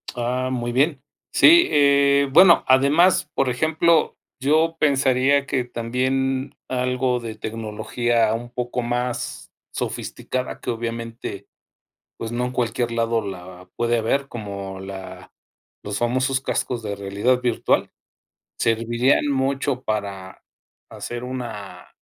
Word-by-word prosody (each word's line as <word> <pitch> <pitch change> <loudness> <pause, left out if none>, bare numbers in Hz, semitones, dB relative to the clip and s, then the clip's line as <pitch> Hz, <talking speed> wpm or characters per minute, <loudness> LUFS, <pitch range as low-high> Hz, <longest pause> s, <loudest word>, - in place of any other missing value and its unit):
Ah, 125 +2 -1
muy 120 -1 -2
bien. 140 +2 +1 0.3
Sí, 345 +2 +7
eh, 140 -1 +4
bueno, 170 +3 +7
además, 145 +5 +4
por 135 -2 +1
ejemplo, 160 +5 +2 0.2
yo 155 +4 +2
pensaría 140 -1 +3
que 130 -2 0
también 130 +3 -1
algo 125 0 0
de 115 -2 -6
tecnología 115 +1 -1
un 120 +1 -6
poco 125 0 -3
más 120 +1 -3 0.2
sofisticada 130 0 -4
que - - -6
obviamente, 115 -3 -5 0.7
pues, 115 - -5
no 125 +1 -1
en 125 - -5
cualquier 120 -1 -1
lado 115 -2 0
la 90 -1 -9
puede 120 0 +1
haber 135 +5 0
como 100 -5 -6
la 95 -1 -9 0.5
los 100 0 -4
famosos 130 +3 0
cascos 125 -2 -2
de 100 -1 -4
realidad 100 +6 0
virtual 120 -2 +1 0.7
servirían 115 +5 +2
mucho 135 -1 -1
para 100 -3 -4 0.5
hacer 120 0 -6
una 110 -8 -7
125 Hz, 115 wpm, -22 LUFS, 115-135 Hz, 0.7 s, Sí